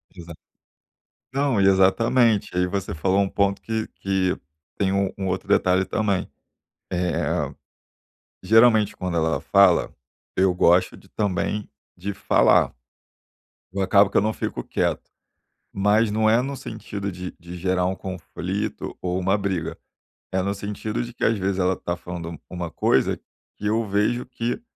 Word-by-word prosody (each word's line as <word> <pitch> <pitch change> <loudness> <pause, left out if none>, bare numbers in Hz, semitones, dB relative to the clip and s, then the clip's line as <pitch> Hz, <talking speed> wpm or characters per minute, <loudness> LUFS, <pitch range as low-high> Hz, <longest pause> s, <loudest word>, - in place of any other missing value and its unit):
Exa 85 -1 -9 1.0
não, 135 -6 +1
e 95 - +5
exatamente. 105 +3 +3
Aí 90 0 +2
você 100 -1 -3
falou 95 +5 +1
um 100 -1 +2
ponto 100 0 0
que 110 -1 -2
que 95 -2 0 0.4
tem 95 -2 +1
um 100 -1 +1
um 95 -1 -3
outro 95 +1 -2
detalhe 95 -2 +3
também. 100 0 -1 0.6
Eh, 90 -2 -1 0.9
geralmente 110 +1 +5
quando 90 -2 -3
ela 80 0 +1
fala, 100 -3 +4 0.4
eu 95 -1 +3
gosto 90 0 +3
de - - -18
também 105 +1 -2 0.3
de 100 +3 -4
falar. - - +3 1.0
Eu 100 - -3
acabo 100 +1 +4
que - - -3
eu - - +5
não 110 +2 0
fico - - -4
quieto, - - -2 0.6
mas 105 +2 +3
não 110 +1 +2
é 115 +2 +4
no 140 +2 -4
sentido 100 -4 -6
de 90 0 -6
de 85 +1 -9
gerar 90 0 0
um 95 +1 0
conflito 95 +2 -5
ou 90 0 -1
uma 95 +2 +2
briga. 95 -5 -2 0.6
É 95 - +2
no 100 +2 -1
sentido 105 +3 -4
de 120 0 -8
que - - -7
às 115 -2 +2
vezes 95 0 -1
ela 95 0 +2
tá 85 - -3
falando 85 -1 -6
um 85 - -7
uma 90 -3 -5
coisa - - +2 0.4
que 105 - -7
eu 110 +2 +1
vejo 105 +4 0
que 125 - -3
95 Hz, 160 wpm, -23 LUFS, 90-105 Hz, 1.0 s, e